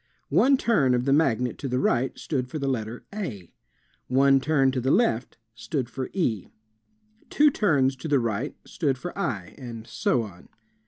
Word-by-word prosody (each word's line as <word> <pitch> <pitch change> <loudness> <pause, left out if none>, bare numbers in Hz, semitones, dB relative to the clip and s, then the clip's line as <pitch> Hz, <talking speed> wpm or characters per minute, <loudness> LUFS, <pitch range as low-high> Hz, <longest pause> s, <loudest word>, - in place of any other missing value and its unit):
One 275 +1 +5
turn 140 - +2
of 125 0 -1
the 135 - +3
magnet 125 -5 +1
to 140 - -4
the 125 0 -1
right 130 0 +1
stood 130 -5 -2
for 155 - -4
the 140 -2 -2
letter 115 -2 -3
a. 120 - -6 0.5
One 135 +1 +4
turn 135 -2 +2
to 130 -1 -2
the 130 - 0
left 140 - +1 0.2
stood 115 +3 -4
for 130 +1 -4
e. 115 - -1 0.8
Two 295 0 +4
turns 140 - +2
to 130 - -6
the 145 -2 +3
right 115 +4 -2
stood 140 -7 -1
for 175 +7 -6
iy 115 - -3
and 115 -4 -8
so 120 0 0
on. 90 -5 -12
130 Hz, 175 wpm, -25 LUFS, 120-145 Hz, 0.8 s, One